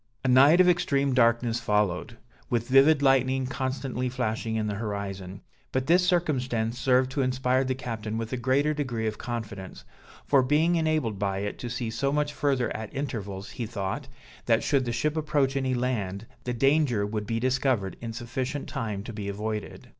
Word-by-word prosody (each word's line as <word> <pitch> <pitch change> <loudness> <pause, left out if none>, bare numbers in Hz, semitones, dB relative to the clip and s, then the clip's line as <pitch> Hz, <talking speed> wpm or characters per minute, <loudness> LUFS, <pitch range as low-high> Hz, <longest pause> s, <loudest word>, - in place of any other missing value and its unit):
A - - +3
night 140 +7 +6
of 185 - +6
extreme 140 -6 +2
darkness 115 -1 +3
followed, 105 -1 0 0.3
with 120 -1 0
vivid 140 +3 +5
lightning 130 -1 +3
constantly 130 -1 -2
flashing 115 -2 -2
in 110 -1 0
the 105 - -2
horizon; 100 -3 -5 0.3
but 130 0 0
this 175 +4 +4
circumstance 130 -10 0
served 130 0 +3
to 140 0 -1
inspire 130 0 +1
the 130 0 -1
captain 115 -4 -4
with 115 +1 -4
a - - 0
greater 135 +5 +2
degree 125 -7 -2
of 110 -1 -3
confidence; 100 - -6 0.4
for 140 -2 +4
being 150 +6 +2
enabled 155 - 0
by 100 -1 -1
it 105 0 -4
to 120 - -5
see 120 -1 -3
so 140 +4 0
much 150 0 0
further 135 -5 0
at 110 -1 -6
intervals, 100 -8 -4
he 120 - -4
thought, 105 +5 -4 0.4
that 115 -1 +3
should 140 -3 +2
the 120 - -1
ship 145 +6 0
approach 145 -3 +1
any 130 -2 0
land, 115 -5 -2 0.2
the 125 - -1
danger 135 -4 +2
would 105 0 -4
be 115 0 -1
discovered 130 -5 0
in 115 -1 -4
sufficient 125 +4 -4
time 110 -8 -4
to 115 - -7
be 105 -2 -4
avoided. 105 +1 -5
125 Hz, 180 wpm, -27 LUFS, 110-135 Hz, 0.4 s, night